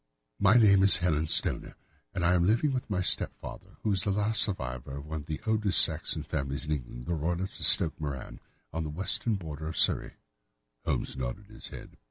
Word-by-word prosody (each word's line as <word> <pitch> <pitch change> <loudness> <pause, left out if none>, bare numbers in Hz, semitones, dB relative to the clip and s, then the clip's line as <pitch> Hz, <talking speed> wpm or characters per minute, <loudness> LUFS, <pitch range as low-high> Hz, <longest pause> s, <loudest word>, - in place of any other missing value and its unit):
"My 100 +3 +4
name 100 -5 +5
is 95 -2 +7
Helen 80 -2 -1
Stoner, - - +2 0.4
and 90 - -1
I 90 - +3
am 90 -1 +2
living 115 +9 +1
with 130 -2 -4
my 95 -3 -1
stepfather, - - -3
who 105 - 0
is 95 -2 +1
the - - -2
last 105 +2 +1
survivor 65 - -2
of 70 - -9
one 80 +1 -5
of 75 - -11
the 75 - -5
oldest 105 -5 +2
Saxon - - +2
families 70 0 -3
in 75 - -5
England, 60 -4 -5
the 85 - -3
Roylotts 85 +4 -3
of - - +6
Stoke 85 -7 +5
Moran, 70 -3 -6 0.3
on 80 +1 -3
the 75 - -5
western 95 +7 -1
border 80 -4 -7
of 80 - -6
Surrey." - - +2 0.7
Holmes - - -2
nodded 80 +12 -6
his 110 +1 -10
head. - - -12
85 Hz, 205 wpm, -28 LUFS, 75-100 Hz, 0.7 s, is